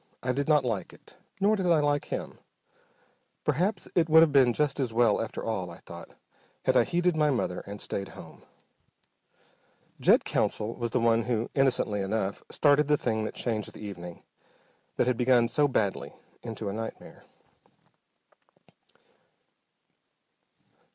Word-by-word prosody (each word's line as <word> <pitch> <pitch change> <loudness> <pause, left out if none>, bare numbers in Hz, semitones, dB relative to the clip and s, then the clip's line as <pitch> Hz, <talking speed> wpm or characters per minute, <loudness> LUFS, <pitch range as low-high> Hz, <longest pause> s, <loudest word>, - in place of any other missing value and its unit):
I 130 - 0
did 140 +3 -2
not 150 -4 +3
like 105 -7 -3
it, - - -16 0.2
nor 205 +2 +3
did 190 -3 -1
I 170 -3 +4
like 145 -1 +1
him. - - -6 1.0
Perhaps 190 +7 0
it 165 -2 +2
would 160 +1 +8
have 160 - +2
been 135 -3 +5
just 145 +2 -1
as 130 -4 -1
well 115 -2 +3
after 115 - -5
all, 100 -6 -3
I 85 - -10
thought, 85 -2 -11 0.6
had - - +2
I - - +5
heeded 175 0 +1
my 150 -1 +2
mother 120 -9 -1
and 100 +1 -7
stayed 100 -1 -4
home. - - -12 1.6
Jed - - +4
Counsell 110 +2 -1
was 120 -1 -3
the 125 - 0
one 115 -1 +2
who, 120 -2 -2
innocently 125 -7 +1
enough, 100 0 -2
started 145 0 +3
the 150 0 +3
thing 110 -4 -1
that - - -6
changed 110 -4 -3
the 105 - -9
evening, 90 -4 -8 0.7
that - - +2
had 125 -1 0
begun 125 -1 +3
so 145 +5 +2
badly, 95 - -2 0.3
into 110 -2 -6
a 100 - -3
nightmare. 110 +1 -8
120 Hz, 150 wpm, -28 LUFS, 105-145 Hz, 1.6 s, would